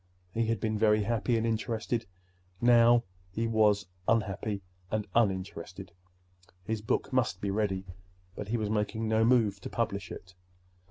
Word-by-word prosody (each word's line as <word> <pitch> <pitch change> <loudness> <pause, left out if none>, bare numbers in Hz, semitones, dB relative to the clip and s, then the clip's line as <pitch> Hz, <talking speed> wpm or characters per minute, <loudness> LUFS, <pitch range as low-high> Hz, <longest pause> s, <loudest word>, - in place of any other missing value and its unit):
He 115 0 0
had 115 -1 0
been 110 0 -1
very 105 -1 +4
happy 115 +1 +1
and 115 - 0
interested. 115 +1 -1 0.5
Now 120 0 +6 0.3
he 110 +5 -2
was 105 -3 +3 0.2
unhappy 105 -2 0 0.3
and 105 +1 -1
uninterested. 95 -4 -1 0.7
His 110 +2 -2
book 120 +5 -1
must 120 -7 +1
be 100 0 -2
ready, 95 -2 -1 0.5
but 105 - -6
he 120 +3 0
was 105 -2 -2
making 110 +1 -1
no 110 0 +3
move 115 -5 +3
to - - -6
publish 100 -5 -2
it. 90 +1 -9
110 Hz, 150 wpm, -30 LUFS, 100-115 Hz, 0.7 s, Now